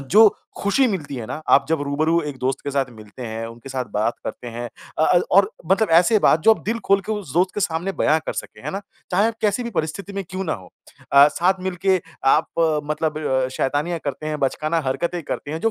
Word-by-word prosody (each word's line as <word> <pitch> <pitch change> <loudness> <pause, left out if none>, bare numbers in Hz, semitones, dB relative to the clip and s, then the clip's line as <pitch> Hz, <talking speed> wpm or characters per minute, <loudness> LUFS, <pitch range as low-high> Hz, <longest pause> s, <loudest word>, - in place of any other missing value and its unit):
जो 210 +11 +6 0.3
ख़ुशी 230 +7 +3
मिलती 155 -9 -3
है 115 - -5
ना, - - -4
आप 140 - +5
जब 160 -2 +1
रूबरू 155 +4 +1
एक 140 - -6
दोस्त 130 +2 -1
के 140 - -2
साथ 140 -1 0
मिलते 110 +2 -12
हैं, 115 0 -4
उनके 115 +3 -11
साथ 130 -1 -2
बात 110 +3 +1
करते 120 - -6
हैं। 120 +1 -5 0.3
अ 160 - +4
अ, 175 -1 +4
और 200 +2 +5 0.2
मतलब 200 -2 +3
ऐसे 215 +5 +4
बात 160 - +4
जो - - +6
आप - - -13
दिल 230 +2 -1
खोल 195 0 +4
के 220 - -1
उस 200 -11 -5
दोस्त 180 +2 +2
के 205 - -2
सामने 175 +2 -1
बयाँ 155 +1 +4
कर - - -1
सकें। - - -7
है - - -2
ना? 195 - -4 0.3
चाहे 200 +4 +3
आप 230 - -4
कैसी 215 +3 +1
भी 235 - -4
परिस्थिति 175 +3 -3
में 195 0 -3
क्यों 190 +1 -3
ना 160 - -1
हों, 95 -3 -8 0.4
अ, 140 +1 +8
साथ 185 +4 +1
मिलके 185 +1 +1 0.3
आप 155 - +1 0.4
मतलब 150 -5 0
शैतानियाँ 150 +5 0
करते 140 +2 -4
हैं, 155 -1 -2
बचकाना 155 +4 0
हरकतें 170 +6 -1
करते 145 - -5
हैं, 160 +2 -4
जो 225 - +2
160 Hz, 235 wpm, -22 LUFS, 135-190 Hz, 0.4 s, अ